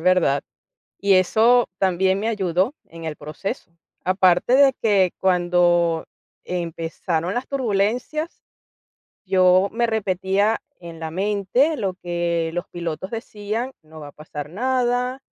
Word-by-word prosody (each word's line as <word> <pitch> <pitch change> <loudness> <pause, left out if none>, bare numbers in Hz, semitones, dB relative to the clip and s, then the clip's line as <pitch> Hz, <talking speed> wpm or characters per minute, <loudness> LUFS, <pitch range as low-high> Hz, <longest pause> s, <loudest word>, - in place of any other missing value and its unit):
verdad. 170 -6 +3 0.6
Y 200 -1 +3
eso 225 +6 +4
también 190 +1 +2
me 220 - -2
ayudó, 190 - 0
en 165 0 -12
el 155 -1 -4
proceso. 170 - -6 0.3
Aparte 185 +4 +3
de 275 0 +6
que, 195 -5 +3
cuando 175 -2 +2 0.4
empezaron 170 0 -3
las 245 +2 -3
turbulencias, 250 +5 -1 0.8
yo 185 0 +4
me 235 +1 +1
repetía, 200 0 +1 0.2
en 165 -1 -9
la 160 -1 -4
mente, 205 - +1
lo 195 -4 -1
que 170 -2 -2
los 175 0 -3
pilotos 170 +2 -5
decían: 225 +2 -4
"No 155 0 -13
va 145 - -9
a - - -11
pasar 150 -1 -8
nada, 250 +4 0
190 Hz, 125 wpm, -22 LUFS, 170-225 Hz, 0.8 s, de